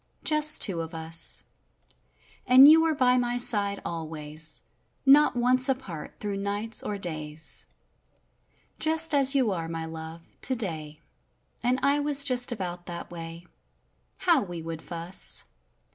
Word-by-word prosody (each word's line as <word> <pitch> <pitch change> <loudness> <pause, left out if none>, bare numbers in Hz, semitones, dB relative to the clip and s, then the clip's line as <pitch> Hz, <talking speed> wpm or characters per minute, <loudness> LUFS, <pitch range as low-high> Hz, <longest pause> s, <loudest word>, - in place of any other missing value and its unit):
Just 305 0 +4
two 180 -5 +1
of 165 +1 -8
us; 160 0 0 1.0
And 260 +2 +8
you 320 +2 +7
were 325 -1 0
by 255 -2 +2
my 245 0 -2
side 205 -4 +2
always; 155 -1 -5 0.4
not 280 0 +5
once 255 +2 +2
apart 225 - -5
through 205 -1 -4
nights 205 +3 -2
or 205 - -5
days, 155 -4 -5 1.1
Just 320 0 +4
as 275 -1 +4
you 255 -6 +1
are, 165 -3 -4
my 165 -1 -5
love, 160 +1 -9 0.2
today; 160 - -3 0.6
and 250 +2 0
I 285 +1 +2
was 290 -1 +3
just 250 -3 +3
about 180 -5 -6
that 170 0 -8
way— 165 0 -9 0.7
How 340 -6 +2
we 175 -5 -7
would 165 -1 -7
fuss! 170 +2 -2
200 Hz, 135 wpm, -26 LUFS, 165-260 Hz, 1.1 s, And